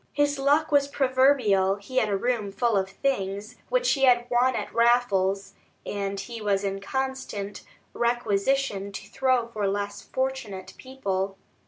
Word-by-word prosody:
His 290 Hz, -1 st, +1 dB
luck 295 Hz, +3 st, +2 dB
was 285 Hz, -1 st, +4 dB
proverbial; 260 Hz, -8 st, +3 dB
he 205 Hz, +6 st, -8 dB
had 215 Hz, -, +3 dB
a 200 Hz, -, +1 dB
room 225 Hz, -2 st, -1 dB
full 225 Hz, +3 st, +1 dB
of 190 Hz, -1 st, +1 dB
things 200 Hz, -2 st, -2 dB
which -, -, +2 dB
he 270 Hz, -2 st, +3 dB
had 240 Hz, -2 st, +4 dB
won 250 Hz, +2 st, +3 dB
at -, -, -4 dB
raffles, 200 Hz, -5 st, +2 dB, 0.3 s
and 200 Hz, -1 st, -3 dB
he 230 Hz, +2 st, -7 dB
was 200 Hz, -1 st, +1 dB
in 195 Hz, 0 st, -2 dB
constant 215 Hz, -3 st, -4 dB, 0.3 s
requisition 235 Hz, -2 st, 0 dB
to 195 Hz, -, -7 dB
throw 255 Hz, 0 st, +1 dB
for 210 Hz, -3 st, -2 dB
less 205 Hz, +1 st, -2 dB
fortunate 260 Hz, -8 st, -4 dB
people. 195 Hz, -7 st, -3 dB
230 Hz, 150 wpm, -26 LUFS, 195-265 Hz, 0.3 s, was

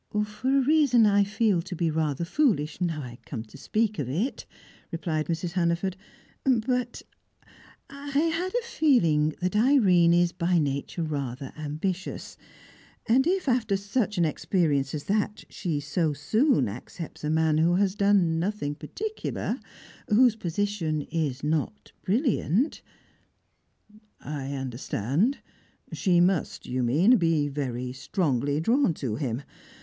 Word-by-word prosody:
"For 250 Hz, +6 st, 0 dB
a -, -, +4 dB
reason 275 Hz, -5 st, +4 dB
I 205 Hz, -1 st, +4 dB
feel 205 Hz, -3 st, +1 dB
to 185 Hz, +1 st, -7 dB
be 165 Hz, -1 st, 0 dB
rather 155 Hz, 0 st, -1 dB
foolish, 185 Hz, -, 0 dB
now 165 Hz, -4 st, -1 dB
I 120 Hz, -1 st, -9 dB
come 115 Hz, -5 st, -6 dB
to 110 Hz, -, -17 dB
speak 215 Hz, -1 st, -1 dB
of 130 Hz, -4 st, -2 dB
it," 195 Hz, -, -2 dB, 0.4 s
replied 160 Hz, -2 st, -2 dB
Mrs. 170 Hz, +1 st, -2 dB
Hannaford. 175 Hz, +1 st, 0 dB, 0.5 s
"But 250 Hz, -1 st, 0 dB, 0.8 s
I 280 Hz, +1 st, -10 dB
had 330 Hz, +4 st, +1 dB
a 485 Hz, -1 st, 0 dB
feeling 165 Hz, -, +2 dB
that 185 Hz, +3 st, -1 dB
Irene 210 Hz, -8 st, +5 dB
is 175 Hz, 0 st, +3 dB
by 175 Hz, 0 st, +1 dB
nature 145 Hz, +2 st, -1 dB
rather 140 Hz, -4 st, -4 dB
ambitious; 155 Hz, +5 st, -4 dB, 0.7 s
and 260 Hz, +6 st, +3 dB
if, 370 Hz, -2 st, 0 dB
after 225 Hz, -6 st, +2 dB
such 205 Hz, +1 st, -1 dB
an 170 Hz, -, +3 dB
experience 150 Hz, -3 st, 0 dB
as 145 Hz, -, -4 dB
that, 210 Hz, +1 st, -1 dB
she 165 Hz, -6 st, -2 dB
so 155 Hz, +2 st, -1 dB
soon 220 Hz, -, +2 dB
accepts 135 Hz, -, -8 dB
a 150 Hz, -, -1 dB
man 160 Hz, 0 st, +2 dB
who 170 Hz, +2 st, +3 dB
has 195 Hz, 0 st, +2 dB
done 200 Hz, -5 st, +2 dB
nothing 175 Hz, -5 st, -2 dB
particular, 415 Hz, -, -4 dB, 0.5 s
whose 235 Hz, +1 st, +5 dB
position 175 Hz, -5 st, -2 dB
is 145 Hz, -5 st, -2 dB
not 155 Hz, +7 st, -2 dB
brilliant 230 Hz, -, +1 dB, 0.8 s
" 215 Hz, 0 st, -27 dB
"I 140 Hz, -2 st, -5 dB
understand. 135 Hz, -, -1 dB, 0.6 s
She 180 Hz, -4 st, +2 dB
must, 175 Hz, -2 st, +1 dB
you 130 Hz, +1 st, -2 dB
mean, 165 Hz, -, +4 dB
be 165 Hz, -5 st, +1 dB
very 125 Hz, -3 st, -3 dB
strongly 140 Hz, -, -1 dB
drawn 230 Hz, -, +2 dB
to 120 Hz, -8 st, -3 dB
him. 130 Hz, -2 st, -3 dB
175 Hz, 135 wpm, -26 LUFS, 150-215 Hz, 0.8 s, Irene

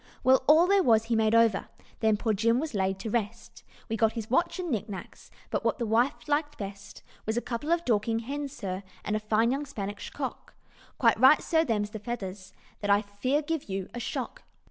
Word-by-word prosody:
"Well! 260 Hz, +1 st, +5 dB
all 315 Hz, +4 st, +7 dB
there 395 Hz, +1 st, +4 dB
was 225 Hz, -8 st, +4 dB
he 230 Hz, 0 st, -1 dB
made 220 Hz, 0 st, +3 dB
over, 230 Hz, -3 st, +3 dB, 0.3 s
Then 220 Hz, -2 st, +3 dB
poor 220 Hz, +1 st, 0 dB
Jim 230 Hz, +4 st, +2 dB
was 310 Hz, -2 st, -4 dB
laid 190 Hz, -1 st, 0 dB
to 220 Hz, -, -4 dB
rest 220 Hz, -3 st, -3 dB, 0.2 s
We 225 Hz, -, -2 dB
got 225 Hz, 0 st, +2 dB
his 225 Hz, -1 st, -6 dB
watch 340 Hz, +7 st, +2 dB
and 355 Hz, -3 st, -3 dB
knicknacks, 210 Hz, -4 st, -5 dB, 0.2 s
But -, -, -1 dB
what -, -, +1 dB
the 240 Hz, -, -2 dB
wife 235 Hz, +7 st, +1 dB
liked 295 Hz, 0 st, 0 dB
best 200 Hz, 0 st, -8 dB, 0.2 s
Was 220 Hz, +1 st, 0 dB
a -, -, +4 dB
couple 250 Hz, +7 st, -4 dB
of 340 Hz, 0 st, +1 dB
Dorking 225 Hz, -1 st, +1 dB
hens, 280 Hz, +4 st, -4 dB
sir, 195 Hz, -9 st, -5 dB, 0.2 s
And 210 Hz, -, 0 dB
a -, -, +1 dB
fine 215 Hz, +2 st, +2 dB
young 280 Hz, +2 st, -2 dB
Spanish 205 Hz, -6 st, -5 dB
cock; -, -, -6 dB, 0.4 s
Quite 230 Hz, -3 st, +3 dB
right, 265 Hz, +5 st, +7 dB
sir, 320 Hz, -1 st, +2 dB
them's 210 Hz, -7 st, -1 dB
the 215 Hz, -, -6 dB
feathers, 195 Hz, -4 st, -6 dB, 0.3 s
That 205 Hz, -, -3 dB
I 200 Hz, +1 st, +4 dB
fear 255 Hz, +9 st, -1 dB
give 320 Hz, -6 st, -3 dB
you 195 Hz, -1 st, -3 dB
a 240 Hz, -, -5 dB
shock. 235 Hz, -, -4 dB
225 Hz, 210 wpm, -28 LUFS, 210-270 Hz, 0.4 s, all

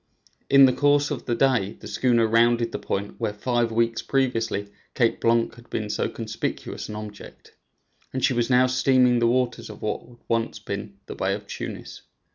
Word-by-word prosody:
In 140 Hz, 0 st, +8 dB
the 130 Hz, -, +4 dB
course 145 Hz, +2 st, +2 dB
of 140 Hz, -, -4 dB
the 120 Hz, -, 0 dB
day 120 Hz, -7 st, +2 dB
the 105 Hz, -, -12 dB
schooner 115 Hz, +2 st, +2 dB
rounded 115 Hz, +1 st, +3 dB
the -, -, -4 dB
point 100 Hz, +1 st, -4 dB
where, 110 Hz, -3 st, -1 dB
five 120 Hz, +2 st, 0 dB
weeks 115 Hz, 0 st, +1 dB
previously, 115 Hz, -6 st, -1 dB, 0.3 s
Cape 115 Hz, -3 st, +1 dB
Blanc 115 Hz, 0 st, +2 dB
had 120 Hz, 0 st, -17 dB
been 105 Hz, -1 st, -3 dB
so -, -, -1 dB
conspicuous 110 Hz, -1 st, -5 dB
an 105 Hz, -, -6 dB
object, 105 Hz, -1 st, -10 dB, 0.6 s
and 130 Hz, -1 st, 0 dB
she 135 Hz, -, +2 dB
was 120 Hz, 0 st, 0 dB
now 125 Hz, 0 st, +5 dB
stemming 130 Hz, -1 st, +3 dB
the 115 Hz, -, +3 dB
waters 125 Hz, -1 st, 0 dB
of 105 Hz, -, -10 dB
what 105 Hz, -, -2 dB, 0.3 s
once 115 Hz, 0 st, -1 dB
had -, -, -17 dB
been 100 Hz, 0 st, -5 dB
the -, -, -7 dB
Bay 95 Hz, +1 st, -1 dB
of 105 Hz, 0 st, -9 dB
Tunis. -, -, -7 dB
115 Hz, 190 wpm, -24 LUFS, 110-125 Hz, 0.6 s, In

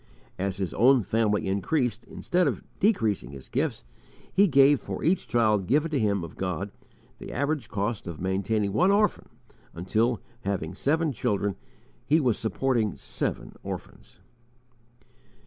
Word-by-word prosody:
As 95 Hz, -1 st, -1 dB
his 95 Hz, -4 st, -3 dB
own 125 Hz, +1 st, +5 dB
family 105 Hz, 0 st, +1 dB
increased, 115 Hz, -, 0 dB
instead 180 Hz, -2 st, 0 dB
of 125 Hz, -8 st, -2 dB, 0.2 s
decreasing 115 Hz, -, +1 dB
his 65 Hz, -1 st, -11 dB
gifts, -, -, -1 dB, 0.5 s
he 200 Hz, +1 st, +5 dB
gave, 140 Hz, -2 st, +5 dB
for -, -, -5 dB
each 175 Hz, +3 st, +1 dB
child 105 Hz, -5 st, +2 dB
given 150 Hz, +6 st, +2 dB
to 145 Hz, -, +1 dB
him 100 Hz, -4 st, +1 dB
of 85 Hz, -, -9 dB
God, 95 Hz, +1 st, -3 dB, 0.5 s
the -, -, -8 dB
average 145 Hz, -1 st, -1 dB
cost 105 Hz, +1 st, -2 dB
of 85 Hz, -3 st, -6 dB
maintaining 100 Hz, +2 st, 0 dB
one 180 Hz, -, +4 dB
orphan, 205 Hz, 0 st, +2 dB, 0.5 s
until, 110 Hz, +7 st, +1 dB, 0.2 s
having 95 Hz, -6 st, -3 dB
seven 155 Hz, -, +1 dB
children, 105 Hz, -5 st, -1 dB, 0.5 s
he 155 Hz, +3 st, +3 dB
was 125 Hz, -7 st, +2 dB
supporting 115 Hz, -3 st, 0 dB
seven -, -, -4 dB
orphans. -, -, -9 dB
110 Hz, 140 wpm, -27 LUFS, 100-140 Hz, 0.5 s, own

